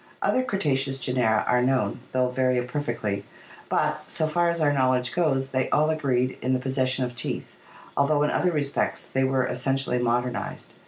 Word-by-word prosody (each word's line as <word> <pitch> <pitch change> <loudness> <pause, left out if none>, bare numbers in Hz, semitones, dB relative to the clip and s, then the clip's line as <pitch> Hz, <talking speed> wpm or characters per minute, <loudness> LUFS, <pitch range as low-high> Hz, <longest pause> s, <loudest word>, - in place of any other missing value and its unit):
Other 255 - +3
Cretaceous 140 - 0
genera 125 -4 +1
are 125 0 +3
known, 130 +1 +1
though 125 -1 +1
very 130 0 +1
imperfectly, 120 -6 -2 0.5
but, - - 0
so 160 - -1
far 170 +2 +2
as 170 0 -1
our 145 -2 +3
knowledge 130 -2 +1
goes, 135 -6 +1
they 130 -1 0
all 155 +1 +3
agreed 130 -5 0
in 130 +1 +1
the 130 - +1
possession 130 0 0
of 120 0 -7
teeth, 120 - -4 0.4
although 145 +1 +3
in 150 - +1
other 180 - +2
respects 145 -3 -1
they 135 - 0
were 130 -1 +2
essentially 125 0 -1
modernized. 120 +1 -2
130 Hz, 170 wpm, -25 LUFS, 125-145 Hz, 0.5 s, Other